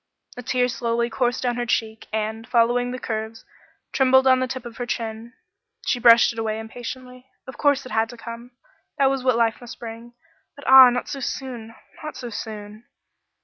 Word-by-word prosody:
A 250 Hz, -, -7 dB
tear 250 Hz, 0 st, +1 dB
slowly 235 Hz, -1 st, -1 dB
coursed 245 Hz, +1 st, -1 dB
down 245 Hz, -1 st, 0 dB
her 240 Hz, -, -1 dB
cheek, 220 Hz, -1 st, -2 dB
and, 220 Hz, +1 st, -3 dB
following 240 Hz, +1 st, +2 dB
the 250 Hz, -, -4 dB
curves, 220 Hz, -2 st, -5 dB, 0.5 s
trembled 265 Hz, 0 st, +4 dB
on 260 Hz, -1 st, +5 dB
the 255 Hz, -, 0 dB
tip 255 Hz, 0 st, -6 dB
of 235 Hz, -1 st, -9 dB
her 245 Hz, -, -4 dB
chin. 230 Hz, 0 st, -5 dB, 0.5 s
She 245 Hz, -, 0 dB
brushed 235 Hz, 0 st, +6 dB
it 230 Hz, -, -7 dB
away 220 Hz, -1 st, -2 dB
impatiently. 250 Hz, +3 st, -8 dB, 0.2 s
Of 260 Hz, -, -11 dB
course 285 Hz, -2 st, +2 dB
it 255 Hz, -, -9 dB
had 220 Hz, +1 st, +1 dB
to 240 Hz, -, -10 dB
come 230 Hz, +1 st, -9 dB, 0.5 s
that 270 Hz, -2 st, +3 dB
was 270 Hz, -2 st, -2 dB
what 255 Hz, -2 st, +3 dB
life 230 Hz, 0 st, +1 dB
must 240 Hz, -1 st, -10 dB
bring 230 Hz, +1 st, -9 dB, 0.4 s
but 285 Hz, -, -13 dB
ah! 265 Hz, -1 st, +10 dB
not 245 Hz, 0 st, -2 dB
so 275 Hz, -, -5 dB
soon 240 Hz, -4 st, -6 dB, 0.3 s
not 305 Hz, -, -6 dB
so 240 Hz, -2 st, -7 dB
soon. 210 Hz, +1 st, -8 dB
240 Hz, 190 wpm, -23 LUFS, 225-255 Hz, 0.5 s, ah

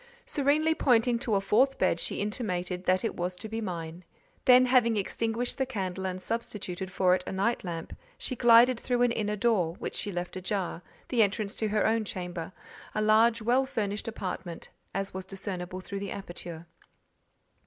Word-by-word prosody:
Serenely 300 Hz, +3 st, +2 dB
pointing 240 Hz, -5 st, +3 dB
to 225 Hz, -3 st, 0 dB
a -, -, +4 dB
fourth 245 Hz, +8 st, +3 dB
bed, 185 Hz, -2 st, +2 dB
she -, -, -1 dB
intimated 185 Hz, -4 st, -2 dB
that 185 Hz, +4 st, +2 dB
it -, -, -1 dB
was 180 Hz, +1 st, -2 dB
to 180 Hz, -, -8 dB
be 225 Hz, +1 st, -4 dB
mine; 170 Hz, -3 st, -5 dB, 0.4 s
then, 255 Hz, 0 st, +8 dB
having 245 Hz, -3 st, +4 dB
extinguished 225 Hz, +5 st, -1 dB
the 265 Hz, -, +2 dB
candle 190 Hz, -5 st, -3 dB
and 185 Hz, 0 st, -4 dB
substituted 190 Hz, -3 st, -4 dB
for 185 Hz, -1 st, +3 dB
it 185 Hz, 0 st, +1 dB
a -, -, -3 dB
night 200 Hz, +5 st, 0 dB
lamp, 165 Hz, -3 st, -5 dB, 0.2 s
she 255 Hz, -, -3 dB
glided 240 Hz, +1 st, +6 dB
through 245 Hz, 0 st, +1 dB
an 245 Hz, -, +3 dB
inner 210 Hz, -2 st, -1 dB
door, 195 Hz, -7 st, +1 dB
which -, -, -5 dB
she 205 Hz, -, -2 dB
left 175 Hz, -1 st, -4 dB
ajar—the 190 Hz, +4 st, -2 dB
entrance 205 Hz, 0 st, 0 dB
to 220 Hz, -, -1 dB
her 210 Hz, 0 st, +1 dB
own 225 Hz, 0 st, +2 dB
chamber, 180 Hz, -4 st, -5 dB, 0.4 s
a 215 Hz, -, +1 dB
large, 220 Hz, +1 st, +4 dB
well 245 Hz, +4 st, +3 dB
furnished 210 Hz, -4 st, -2 dB
apartment; 180 Hz, -5 st, -5 dB, 0.2 s
as 195 Hz, +1 st, -3 dB
was 190 Hz, 0 st, -4 dB
discernible 185 Hz, -1 st, -5 dB
through 200 Hz, +1 st, -5 dB
the 200 Hz, 0 st, -4 dB
aperture. 175 Hz, -3 st, -7 dB
205 Hz, 175 wpm, -29 LUFS, 185-230 Hz, 0.4 s, then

